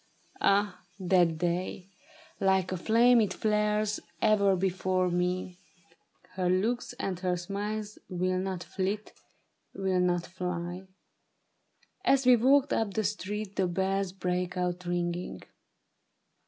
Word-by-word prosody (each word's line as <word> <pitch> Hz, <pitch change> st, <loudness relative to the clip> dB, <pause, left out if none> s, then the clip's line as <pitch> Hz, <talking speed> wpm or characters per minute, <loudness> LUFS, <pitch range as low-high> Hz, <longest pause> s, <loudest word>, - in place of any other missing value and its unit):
Ah, 200 Hz, -2 st, +2 dB, 0.2 s
that 175 Hz, -3 st, +3 dB
day! 180 Hz, +2 st, -2 dB, 0.5 s
Like 190 Hz, -1 st, +2 dB
a 185 Hz, -, -1 dB
flame 235 Hz, +5 st, +5 dB
It 200 Hz, -3 st, 0 dB
flares 210 Hz, 0 st, +1 dB, 0.2 s
ever 200 Hz, -2 st, +4 dB
before 185 Hz, 0 st, 0 dB
me; 180 Hz, +1 st, -1 dB, 0.7 s
her 185 Hz, -1 st, -1 dB
looks 225 Hz, +8 st, 0 dB
and 195 Hz, -8 st, -3 dB
her 180 Hz, -1 st, 0 dB
smiles 205 Hz, +4 st, -4 dB
Will 185 Hz, 0 st, 0 dB
not 185 Hz, -2 st, -3 dB
flit, 200 Hz, +3 st, -3 dB, 0.6 s
will 190 Hz, -2 st, 0 dB
not 175 Hz, -1 st, +1 dB
fly. 180 Hz, 0 st, -5 dB, 1.2 s
As 275 Hz, -7 st, +3 dB
we 250 Hz, 0 st, +8 dB
walked 270 Hz, +4 st, +4 dB
up 210 Hz, -3 st, -1 dB
the 220 Hz, -, +1 dB
street 205 Hz, 0 st, -3 dB
The 190 Hz, -, +2 dB
bells 190 Hz, +1 st, 0 dB
brake 180 Hz, -1 st, -2 dB
out 180 Hz, 0 st, -2 dB
ringing. 175 Hz, 0 st, -2 dB
190 Hz, 120 wpm, -29 LUFS, 180-210 Hz, 1.2 s, we